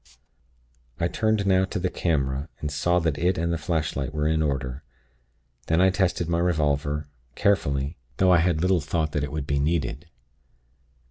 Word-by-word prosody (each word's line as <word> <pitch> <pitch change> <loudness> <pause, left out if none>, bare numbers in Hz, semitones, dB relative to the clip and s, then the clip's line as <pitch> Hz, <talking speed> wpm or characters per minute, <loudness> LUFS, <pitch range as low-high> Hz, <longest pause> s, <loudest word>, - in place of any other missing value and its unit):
"I 85 - +2
turned 110 +1 0
now 95 -1 +4
to 95 - -4
the 90 0 -1
camera, 70 -3 -1
and 75 - -3
saw 85 +4 +1
that 80 -4 0
it 90 +2 +1
and 85 +1 0
the - - 0
flashlight 75 -3 -2
were 75 0 +1
in 80 0 +1
order. 70 -3 -2 0.9
Then 80 - +2
I 95 +1 +5
tested 90 -3 0
my 85 0 0
revolver, 75 -3 0 0.3
carefully, 70 -7 +1 0.2
though 95 -1 +4
I 90 - +6
had 85 -2 +1
little 90 -1 +2
thought 80 +1 -1
that 75 - -1
it 70 - -3
would 75 -2 -3
be 70 0 0
needed. 75 -1 -1
80 Hz, 175 wpm, -25 LUFS, 70-90 Hz, 0.9 s, I